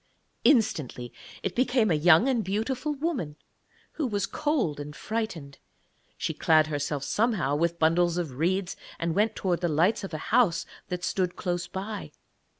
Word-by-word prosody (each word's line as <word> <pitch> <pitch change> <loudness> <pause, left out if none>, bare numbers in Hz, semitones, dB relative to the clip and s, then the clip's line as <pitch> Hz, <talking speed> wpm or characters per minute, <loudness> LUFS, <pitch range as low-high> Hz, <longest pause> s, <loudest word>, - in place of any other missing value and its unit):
Instantly 155 - +2 0.3
it 195 - -2
became 245 -4 +2
a - - +4
young 160 - +5
and 245 -5 +1
beautiful 245 +9 -2
woman, 275 - -2 0.6
who 300 - -2
was 205 -4 -1
cold 280 - -1
and 145 +1 -7
frightened. 180 -12 -4 0.6
She - - -2
clad 155 -1 +4
herself 145 -2 -2
somehow 205 - +1
with 170 +2 0
bundles 170 +1 +3
of 170 -5 -2
reeds, 175 +7 -1 0.2
and 170 -1 -1
went 215 +4 +1
towards 180 -2 -1
the 175 - +1
lights 170 +9 +2
of 195 - -5
a 155 - -6
house 235 -9 +4 0.2
that 180 -1 -4
stood 180 -2 -1
close 175 -2 -2
by. 200 +2 -6
180 Hz, 155 wpm, -27 LUFS, 160-220 Hz, 0.6 s, young